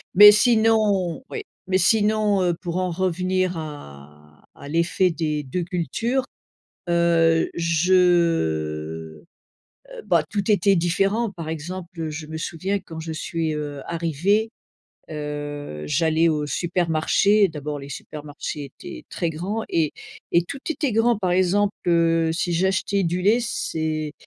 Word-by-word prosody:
Mais 205 +2 +11
sinon 215 -3 +2
oui. 445 - -5 0.2
Mais 185 0 +2
sinon, 210 +1 +2
heu, 175 -1 +1
pour 175 0 -5
en 185 0 0
revenir 185 0 0
à 75 - -10
à - - -11
l'effet 170 +4 +1
des 155 -2 -2
2 175 +7 -3
cultures, 225 +9 -1 0.6
heu, 170 -1 +3
je 170 +2 +1
heu, 80 - +1 0.8
bah, - - +3
tout 205 0 0
était 200 0 +4
différent. 195 +6 +1
Par 170 -5 -8
exemple, 175 +2 -6
heu, 160 - -2
je 155 0 -7
me 160 +1 -6
souviens 185 +5 -2
quand 165 -3 -9
je 160 0 -5
suis, 160 0 -2
heu, 145 -2 -5
arrivée, 175 +7 0 0.6
heu, 145 - -5
j'allais 160 +2 +2
au 150 -2 -1
supermarché, 175 +5 +2
d'abord 150 -1 -5
les 140 0 -9
supermarchés 145 0 -7
étaient - - -9
très 170 - -2
grands 190 +8 -3
et 160 -3 +1 0.4
et 170 - +4
tout 275 +10 -7
était 290 -5 -1
grand. 225 +1 +3
Par 185 -3 -1
exemple, 190 +3 +2
heu, 165 -1 +3
si 175 +1 -1
j'achetais 190 +3 +1
du 175 +1 -1
lait 210 +6 +4
c'est 160 - -3
170 Hz, 140 wpm, -23 LUFS, 155-195 Hz, 0.8 s, Mais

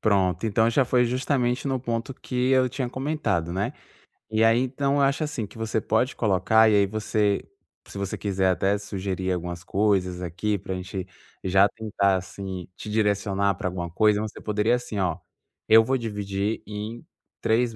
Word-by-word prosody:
Pronto. 95 -2 +2
Então 110 +2 +3
já 135 +3 +3
foi 125 0 +3
justamente 125 +1 0
no 130 -2 0
ponto 120 +2 -3
que 125 0 -1
eu 130 -1 +4
tinha 130 -1 -3
comentado, 120 - -1
né. 95 +3 -1 0.6
E 110 +1 +2
aí 115 +1 +5
então, 140 +2 0
eu 145 - +2
acho 140 +3 +2
assim, 150 -7 -3
que 105 - -14
você 110 0 -1
pode 110 +5 0
colocar, 110 +1 +4
e 105 - +4
aí 100 -1 +5
você 105 0 0 0.4
se 100 - -8
você 100 -1 -3
quiser 95 -2 +1
até 95 +2 +2
sugerir 95 -2 -3
algumas 90 0 -4
coisas 95 -3 +1
aqui, 90 +4 -2
pra 95 0 -5
gente 95 0 -5 0.4
já 95 +2 +4
tentar 100 -3 0
assim, 95 -1 -5
te - - -8
direcionar 100 -2 +1
pra 95 - -3
alguma 85 -2 -4
coisa. 105 +3 +3
Você 110 -1 -6
poderia, 105 +2 +1
assim, 125 -3 -2
ó. 90 -4 0 0.5
Eu 110 +1 +8
vou 130 +4 0
dividir 105 -3 -2
em 105 +3 -6 0.4
3 115 +1 +1
105 Hz, 175 wpm, -25 LUFS, 95-120 Hz, 0.6 s, Eu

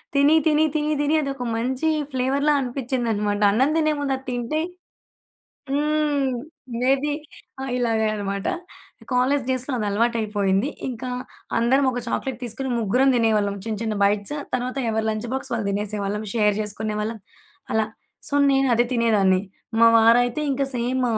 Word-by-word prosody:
తిని, 285 +2 +5
తిని, 310 0 +4
తిని, 305 0 +1
తిని 295 +2 +2
అదొక 275 -3 -3
మంచి 260 +6 -1 0.2
ఫ్లేవర్‌లా 275 +3 +1
అనిపిచ్చిందనమాట. 235 -5 -1
అన్నం 260 +7 +3
తినే 310 -1 +3
ముందు 275 -1 0
అది 265 - -15
తింటే 245 +5 -2 1.1
హ్మ్. 295 -1 +1 0.5
మేబీ 275 +3 +2 0.5
ఆ! - - -3
ఇలాగే 225 -3 +1
అనమాట. 200 -1 -3 0.6
కాలేజ్ 255 +2 +2
డేస్‌లో 255 +2 -1
అది 215 - -2
అలవాటయిపోయింది. 210 0 +1 0.2
ఇంకా 250 +1 -5 0.5
అందరం 260 +4 +3
ఒక 245 - -3
చాక్లెట్ 260 0 -2
తీసుకొని 250 +3 -4
ముగ్గురం 250 +6 +3
దినేవాళ్ళం. 215 -3 +2
చిన్న 220 -2 -2
చిన్న 220 -1 -1
బైట్స్. 205 +7 +1 0.2
తర్వాత 255 +2 -2
ఎవరి 220 0 0
లంచ్ 215 +2 -3
బాక్స్ 265 -1 -4
వాళ్ళు 220 -3 -1
దినేసేవాళ్ళం, 205 +1 -2
షేర్ 210 -3 +3
జేసుకునేవాళ్ళం 215 +1 -3 0.5
అలా. 220 -1 +2 0.4
సో, - - -6 0.2
నేను 270 0 +3
అదే 240 - +4
తినేదాన్ని. 205 -5 +3 0.4
మా 230 - +7
వారైతే 240 +5 +4
ఇంక 275 +1 0
సేమ్ 250 +2 0
240 Hz, 140 wpm, -23 LUFS, 215-270 Hz, 1.1 s, మా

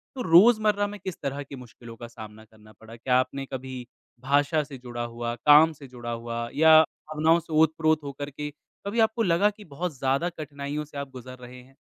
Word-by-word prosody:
तो 260 - -4
रोज़मर्रा 210 +2 +5
में 205 0 -9
किस 190 -3 -6
तरह 140 0 -3
के 140 - -10
मुश्किलों 120 -2 -12
का 120 +1 -9
सामना 110 -1 -12
करना 110 0 -20
पड़ा? 110 +2 -14
क्या 125 +2 0
आपने 135 +2 -3
कभी 130 -1 -7 0.4
भाषा 145 +3 +1
से 140 -2 -10
जुड़ा 120 -1 -6
हुआ, 120 0 -4
काम 150 +6 +6
से 140 -2 -13
जुड़ा 120 -2 -7
हुआ 115 0 -4
या 160 0 +7
भावनाओं 155 +2 0
से 160 -1 -10
ओत-प्रोत 155 0 +2
होकर 140 0 -6
के 150 +1 -6 0.4
कभी 205 +4 -2
आपको 225 +1 +2
लगा 185 +3 +3
कि 210 0 -13
बहुत 155 0 -5
ज़्यादा 135 +6 0
कठिनाइयों 150 -2 -6
से 145 -1 -12
आप 140 -1 -5
गुज़र 130 0 -10
रहे 125 0 -12
हैं? 130 +2 -21
140 Hz, 200 wpm, -26 LUFS, 125-160 Hz, 0.4 s, या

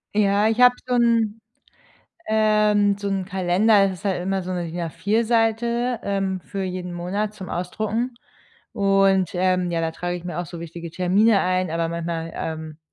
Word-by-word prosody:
Ja, 205 0 +3
ich 225 +2 +1
habe 250 0 +8
so 250 - -1
'n 230 -2 +2 0.9
ähm, 210 -2 +3
so 200 0 -4
'n 195 -1 -1
Kalender, 195 +2 +3
ist 180 - -11
halt 190 -3 0
immer 195 +1 -1
so 185 - -4
'ne 175 -1 -2
DIN 175 +2 -5
A4 195 +8 0
Seite, 235 +1 +1
ähm, 195 -2 -1
für 195 +2 -5
jeden 180 -1 -4
Monat 200 +5 -3
zum 190 -4 -8
Ausdrucken 215 +7 -2 0.6
und, 195 -3 +3
ähm, 180 0 +1
ja, 165 - 0
da 165 - -1
trage 175 +2 -4
ich 175 - -10
mir 175 -2 -5
auch 175 - -5
so 165 +2 -9
wichtige 170 0 -8
Termine 195 +5 +3
ein, 185 -1 0
aber 165 0 -1
manchmal, 165 0 -4
ähm, 160 -1 -5
195 Hz, 175 wpm, -23 LUFS, 175-215 Hz, 0.9 s, habe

